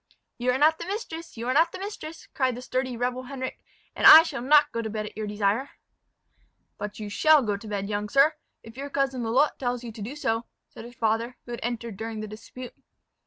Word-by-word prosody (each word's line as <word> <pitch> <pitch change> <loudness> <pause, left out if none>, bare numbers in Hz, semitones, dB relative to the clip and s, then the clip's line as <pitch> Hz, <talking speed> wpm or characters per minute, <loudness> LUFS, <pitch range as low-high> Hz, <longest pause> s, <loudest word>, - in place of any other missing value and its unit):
"You 245 +1 0
are 250 - 0
not 310 +3 +4
the 340 - -6
mistress 335 - -6
you 230 +2 -4
are 255 - +1
not 325 +4 +4
the - - -7
mistress!" 375 -5 -7
cried 255 -3 0
the 250 - -8
sturdy 255 -1 -2
rebel 250 +1 -2
Henric; 260 -1 -6 0.4
"and - - +5
I 320 - +12
shall 330 - -5
not 295 +3 +5
go 230 - -2
to 220 - -4
bed 215 0 -4
at - - -9
your 215 -1 -4
desire." 210 +6 0 1.1
"But 205 0 -5
you 210 - -5
shall 300 +8 +4
go 210 -3 0
to 200 +2 -9
bed, 200 -1 -3
young 210 0 -3
sir, 275 +5 +5 0.3
if 225 +2 -13
your 280 +1 -5
cousin 275 -2 -1
Lalotte 250 +6 +1
tells 245 -1 -2
you 240 - -6
so - - -16
to 220 - -10
do," 235 +8 -6
said 225 -3 -5
his 240 +1 -12
father, 230 +2 -1
who 240 - -9
had 235 - -5
entered 235 -3 -4
during 225 0 -5
the 215 - -5
dispute. 230 +4 -10
245 Hz, 230 wpm, -26 LUFS, 220-275 Hz, 1.1 s, I